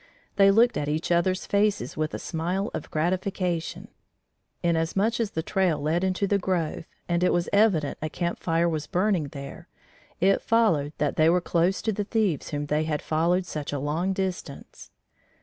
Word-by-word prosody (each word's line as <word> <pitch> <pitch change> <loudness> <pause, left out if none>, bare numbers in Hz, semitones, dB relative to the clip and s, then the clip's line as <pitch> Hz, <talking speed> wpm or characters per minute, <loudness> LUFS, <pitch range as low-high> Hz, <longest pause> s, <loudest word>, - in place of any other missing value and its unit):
They 195 0 +6
looked 230 +3 +4
in 145 - -2
each 155 +3 -2
others' 185 +2 +1
faces 205 0 0
with 155 0 -2
a - - -2
smile 180 +6 -2
of - - -5
gratification: 175 +1 -2 0.8
inasmuch 175 +7 +1
as 225 -3 0
the 160 -4 -3
trail 180 -4 +1
led 160 +5 0
into 190 +1 0
the 200 0 +1
grove 175 -4 -2 0.2
and 175 0 +1
it 180 - +3
was 175 0 +1
evident 200 -9 +2
a 155 - -2
camp 170 +2 -3
fire 165 0 +1
was 155 -3 -2
burning 185 -4 +1
there, 140 -1 -9 0.5
it 195 +2 +3
followed 170 -11 +2
that 150 -1 -1
they 155 +1 +5
were 180 +2 +4
close 175 +2 0
to 220 - +1
the 205 0 -2
thieves 200 - 0
whom 145 -1 -3
they 150 +2 0
had 150 -2 -2
followed 170 +4 +1
such 150 -4 -5
a 145 - -2
long 155 +7 -1
distance. 185 -7 -5
175 Hz, 180 wpm, -26 LUFS, 155-195 Hz, 0.8 s, They